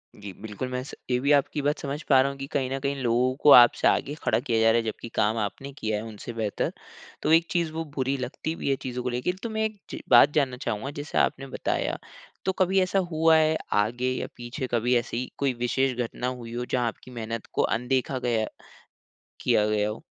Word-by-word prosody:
जी 100 -1 -8
बिल्कुल 110 +4 -5
मैं 125 0 -3
स 135 - -10 0.2
ये 125 - +2
भी 140 +3 +1
आपकी 145 +1 +2
बात 145 +1 0
समझ 145 +1 -4
पा 135 -2 +7
रहा 135 - +1
हूँ 140 - -10
कि 135 0 -6
कहीं 135 -2 -1
न 135 - -2
कहीं 140 +1 -1
लोगों 125 +2 +2
को 150 - +8
आपसे 120 -3 +8
आगे 145 - +1
खड़ा - - +2
किया 115 -5 0
जा 115 0 +5
रहा 115 - +3
है 115 - +1
जबकि 110 +1 -5
काम 110 +2 +2
आपने 110 +6 -4
किया 110 -4 -1
है 105 - -5
उनसे 110 +2 -8
बेहतर। 110 -3 -2 0.5
तो - - +1
एक 165 +1 +5
चीज़, 170 -3 0
वो 165 +1 -2
बुरी 135 0 0
लगती 130 +5 -4
भी 140 - -3
है 135 - +3
चीज़ों 125 -1 -4
को 125 - -1
लेके 125 +7 -1
तो 230 - -2
मैं 220 0 -1
एक 215 -1 -4
च - - -6
बात 125 +4 +7
जानना 135 -5 +1
चाहूँगा 120 +2 -3
जैसे 145 - -5
आपने 135 - +1
बताया - - -2 0.5
तो 190 - +2
कभी 190 +1 +3
ऐसा 185 +1 +1
हुआ 160 0 +4
है 155 0 +3 0.2
आगे 120 +4 -1
या 130 - -3
पीछे 120 +3 -5
कभी 120 +1 +2
ऐसी 120 +1 -2
कोई 140 -2 +1
विशेष 130 +1 +1
घटना 120 +1 -4
हुई 120 -2 -6
हो 120 +1 -3
जहाँ 125 -2 +1
आपकी 115 +2 -7
मेहनत 115 -2 -5
को - - +1
अनदेखा 130 +3 0
गया 115 -3 0 0.9
किया 105 - +3
गया 105 0 +1
हो? 105 - -7
125 Hz, 230 wpm, -26 LUFS, 115-140 Hz, 0.9 s, को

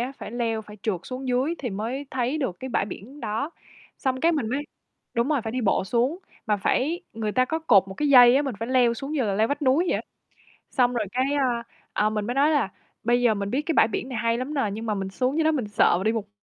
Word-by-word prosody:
á, 250 +3 -2
phải - - -7
leo, 230 -2 -1
phải 210 0 -12
trượt 195 -6 -1
xuống 260 +1 -6
dưới 255 +6 +1
thì 245 - -4
mới 230 +8 -4
thấy 260 +3 -1
được 260 -12 -2
cái 260 - -5
bãi 225 - +1
biển 230 +8 -9
đó. 225 +6 -2 0.5
Xong 260 -2 -1
cái 335 +3 +4
mình 280 -9 -1
mới 270 +5 -1 0.5
đúng 235 +3 +1
rồi, 300 -4 +2
phải 220 0 -4
đi 255 - -1
bộ 205 -4 +1
xuống, 245 - 0 0.3
mà 210 - +2
phải 285 - 0
người 220 -2 -3
ta 255 +2 +3
có 320 +5 -2
cột 205 -12 +4
một 190 - -7
cái 295 +7 0
dây 250 -2 +8
á, 285 - +3
mình 270 -4 -3
phải 230 +2 -4
leo 250 -2 +3
xuống 275 +5 -6
như 295 -4 +1
là 200 -2 0
leo 215 +3 +3
vách 290 +1 -2
núi 275 +5 +3
vậy - - +2
á. - - -4 0.7
Xong 250 -2 +2
rồi 220 -4 -1
cái, 255 +2 +1
a, 250 -4 +1 0.3
ờ, 215 +1 +1
mình 210 -1 -2
mới 245 - -2
nói 285 +3 +4
là 290 -10 +2 0.4
bây 240 +1 +3
giờ 235 -3 +4
mình 200 -1 -3
biết 270 +6 0
cái 325 - -1
bãi - - +5
biển 245 - -3
này 250 -4 -4
hay 230 +1 +1
lắm 265 +4 -4
nè, 270 -7 +1
nhưng 220 +3 -5
mà 215 - 0
mình 195 -1 -3
xuống 255 +8 -1
dưới 320 - +2
đó 315 - +4
mình 255 -9 -2
sợ 205 +2 +3
là 190 - -4
đi 220 - +3
một 220 -3 -3
245 Hz, 280 wpm, -25 LUFS, 220-275 Hz, 0.7 s, dây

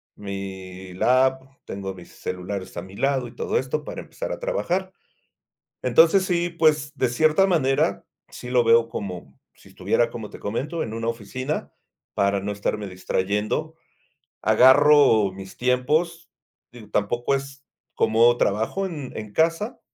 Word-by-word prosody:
mi 95 -2 -7
lap, 130 +6 +3 0.2
tengo 95 -1 -6
mis 90 -2 -13
celulares 95 +1 -6
a 85 - -4
mi 95 +1 -12
lado 135 +1 0
y 115 - -14
todo - - -1
esto 135 +3 -2
para - - -6
empezar - - -6
a - - -4
trabajar. 190 - -2 0.9
Entonces, 165 +10 +5
sí, 175 -2 0
pues, 155 -3 +2
de 130 -3 +1
cierta 155 +9 +3
manera, 135 -7 +1 0.2
sí 125 - -9
lo 125 -1 +4
veo 115 0 +4
como 90 -11 -7 0.2
si - - -19
estuviera, 120 -1 0
como 110 -3 -7
te - - -11
comento, 145 +11 -3
en 110 - -6
una 115 0 -3
oficina. 130 +6 -4 0.4
Para 100 0 +1
no 105 +1 -3
estarme 105 0 -3
distrayendo, 105 - -2 0.7
agarro 130 -3 +6
mis 95 0 -10
tiempos, 155 +7 0 0.4
digo, 115 -4 -13
tampoco 120 +6 0
es 135 0 -4 0.3
como 115 +2 +4
trabajo 110 - 0
en 150 -8 -6
en 105 -1 -7
casa 165 - 0
120 Hz, 145 wpm, -24 LUFS, 100-150 Hz, 0.9 s, agarro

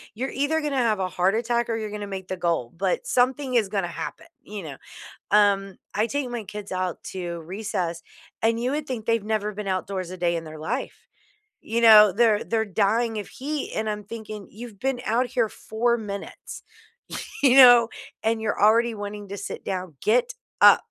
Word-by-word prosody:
you're 260 +5 -3
either 290 +4 0
gonna 290 -2 -2
have 225 -5 +2
a 185 - -1
heart 185 +3 +1
attack 235 +1 0
or 225 - 0
you're 215 -2 -4
gonna 205 -1 -5
make 190 -2 -6
the 185 - -3
goal. 165 -9 -1
But 185 0 -1
something 255 +1 +1
is 225 -4 +3
gonna 195 -3 -1
happen, 170 - -7
you 205 -2 -8
know? 145 -4 -8 0.5
Um, 200 -2 +3 0.2
I 215 +2 +2
take 285 -1 -2
my 240 -2 -4
kids 205 +1 -8
out 185 -1 -2
to 175 -2 -4
recess, 180 -2 -3 0.4
and 225 +1 +2
you 250 +2 0
would 300 +1 -2
think 240 -5 -4
they've 230 -2 +1
never 215 -1 -1
been 210 0 -6
outdoors 185 -1 -3
a 185 - -6
day 175 -1 0
in 165 - -3
their 155 0 -9
life. 225 - -4 0.6
You 230 +1 -1
know, 215 -3 +9
they're 220 0 +3
they're 225 -1 0
dying 220 +3 +1
of 205 - -6
heat, 290 +2 -4
and 220 0 -1
I'm 210 0 -4
thinking, 215 -2 -8
"You've 220 -1 -10
been 265 0 -1
out 240 +3 +1
here 240 -2 +1
4 235 +2 -1
minutes," 200 -3 -7 0.8
you 265 -2 +6
know? 245 -3 +9 0.4
"And 225 0 +1
you're 215 -2 -2
already 230 +2 +4
wanting 205 0 -6
to 200 - -4
sit - - -7
down. 185 -4 -4
Get 250 - +2 0.3
up." - - +7
215 Hz, 195 wpm, -25 LUFS, 195-235 Hz, 0.8 s, know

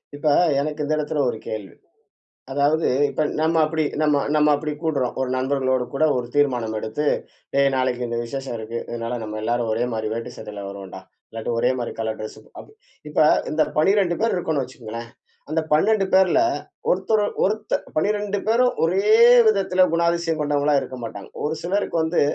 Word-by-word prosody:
இப்போ 150 +1 +1 0.3
எனக்கு 150 +1 -3
இந்த 155 - 0
இடத்தில 150 -1 -1
ஒரு 110 - -4
கேள்வி. 105 -4 -6 0.8
அதாவது 145 +4 +2 0.2
இப்ப - - -1 0.2
நம்ம 160 +1 +2
அப்படி 160 0 -1 0.2
நம்ம 150 -2 +3
நம்ம 150 0 +4
அப்படி 150 +1 -4
கூடுறோம். 145 -6 -1
ஒரு 130 -1 -1
நண்பர்களோடு 130 -1 0
கூட 140 +3 +1
ஒரு 125 -1 -2
தீர்மானம் 125 -6 +1
எடுத்து 110 +8 -3 0.5
"டேய் 140 0 +4
நாளைக்கு 125 -1 0
இந்த 120 - -3
விசேஷம் 130 0 -5
இருக்கு. 110 +2 -5
அதனால 120 +1 -4
நம்ம 110 0 -5
எல்லாரும் 120 0 0
ஒரே 115 +2 0
மாதிரி 110 -1 -2
வேட்டி 115 0 -5
சட்டையில 105 -1 -8
வருவோம்டா. 100 -1 -9 0.3
இல்லாட்டி 115 0 -5
ஒரே 125 - +2
மாதிரி 120 - -3
கலர் 110 -1 -3
டிரெஸ்" 110 - -7 0.7
இப்ப - - 0 0.3
இந்த 155 +1 +2
12 180 +2 +3
பேர் 225 - +2
இருக்கோம்னு 160 -5 -1
வச்சுக்கோங்களேன். 115 -2 -8 0.4
அந்த 160 +1 +1
12 195 +6 +3
பேரில் 190 -2 +5 0.5
ஒருத்தரு 205 +3 +2 0.2
ஒருத் 215 +2 0 0.2
12 205 +4 0
பேரும் 245 +3 +3
ஒரே 190 +5 +1 0.4
விதத்தில் 190 -3 +3
குணாதிசயம் 170 -1 +1
கொண்டவங்களா 145 0 +1
இருக்க 130 -1 -7
மாட்டாங்க. 100 -3 -8 0.2
ஒரு 150 +2 0
சிலருக்கு 190 +1 -1
வந்து 160 +2 +1
145 Hz, 160 wpm, -22 LUFS, 120-165 Hz, 0.8 s, பேரில்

